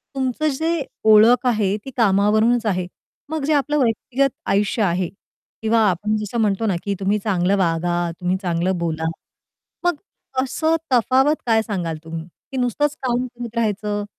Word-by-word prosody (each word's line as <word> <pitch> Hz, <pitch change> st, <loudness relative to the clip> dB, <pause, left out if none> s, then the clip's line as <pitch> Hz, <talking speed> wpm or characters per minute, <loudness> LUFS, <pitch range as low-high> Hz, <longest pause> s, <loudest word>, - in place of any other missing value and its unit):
तुमचं 265 Hz, +3 st, -1 dB
जे 320 Hz, +2 st, -1 dB, 0.3 s
ओळख 235 Hz, +4 st, +6 dB
आहे 210 Hz, -5 st, +1 dB
ती 270 Hz, -, -7 dB
कामावरूनच 215 Hz, +2 st, +3 dB
आहे. 185 Hz, -4 st, 0 dB, 0.4 s
मग 315 Hz, -2 st, -3 dB
जे 310 Hz, -, +2 dB
आपलं 295 Hz, +1 st, +1 dB
व्यक्तिगत 255 Hz, +4 st, +1 dB, 0.2 s
आयुष्य 205 Hz, +3 st, +1 dB
आहे 180 Hz, -1 st, +1 dB, 0.5 s
किंवा 225 Hz, +1 st, +2 dB
आपण 205 Hz, +4 st, -1 dB
जसं 210 Hz, +2 st, -4 dB
म्हणतो 210 Hz, +1 st, +1 dB
ना 195 Hz, -, +1 dB
की 200 Hz, -, -1 dB
तुम्ही 200 Hz, +2 st, +1 dB
चांगलं 195 Hz, -2 st, +1 dB
वागा, 175 Hz, -1 st, 0 dB
तुम्ही 180 Hz, 0 st, 0 dB
चांगलं 180 Hz, 0 st, 0 dB
बोला. 160 Hz, -2 st, -2 dB, 0.8 s
मग 350 Hz, -, +3 dB, 0.5 s
असं 315 Hz, +5 st, 0 dB, 0.2 s
तफावत 260 Hz, +5 st, +4 dB
काय 225 Hz, -2 st, +3 dB
सांगाल 180 Hz, -7 st, -3 dB
तुम्ही 165 Hz, 0 st, -6 dB, 0.3 s
की 265 Hz, -, -4 dB
नुसतंच 270 Hz, +4 st, 0 dB
काम 250 Hz, 0 st, 0 dB
करत 240 Hz, -1 st, -7 dB
राहायचं? 210 Hz, -2 st, -1 dB
215 Hz, 150 wpm, -21 LUFS, 190-250 Hz, 0.8 s, ओळख